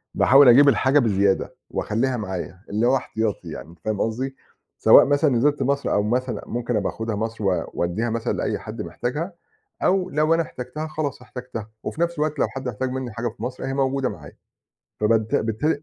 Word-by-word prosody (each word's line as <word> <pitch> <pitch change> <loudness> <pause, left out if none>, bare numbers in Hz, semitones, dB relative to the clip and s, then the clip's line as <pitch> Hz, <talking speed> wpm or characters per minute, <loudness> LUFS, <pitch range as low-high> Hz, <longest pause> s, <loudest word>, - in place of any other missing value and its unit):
باحاول 135 -1 +7
أجيب 140 +4 +8
الحاجة 140 +2 +3
بزيادة 100 -5 +1 0.2
وأخلِّيها 125 +4 -1
معايا، 95 -3 -5
اللي 110 +4 +1
هو 135 - +4
احتياطي 110 -8 -2
يعني، 80 +1 -8
أنت 85 -1 -17
فاهِم 110 +2 -2
قصدي؟ 130 +4 -2 0.4
سواء - - +8
مثلًا 145 +1 +3
نِزِلت 140 +3 +2
مصر، 140 +1 0
أو 105 - +2
مثلًا 125 +3 -1
ممكن 120 0 -2
أبقى 100 -2 0
آخدها 110 -1 -3
مصر، 110 0 -4
و 95 -2 +1
وأدِّيها 100 +7 -1
مثلًا 115 0 -1
لأي - - -2
حد - - -7
محتاجها، 150 +10 -3 0.5
أو 185 0 +2
لو 155 +1 +2
أنا 165 - +3
احتَجتها 140 +4 -6
خلاص 150 -5 -4
احتَجتها. 125 -4 -8
وفي 165 - -4
نفس 170 0 +1
الوقت 155 -1 -1
لو - - +3
حد 135 -1 -6
احتاج 125 +2 -2
مني 130 -2 -4
حاجة 120 +2 -3
في 110 - -11
مصر، 130 +1 -5
أهي 135 0 -2
موجودة 135 -1 0
معايا. 75 -3 -11 0.6
فبالت 110 0 +2
بالتالي 145 +8 0
125 Hz, 190 wpm, -23 LUFS, 110-140 Hz, 0.6 s, أجيب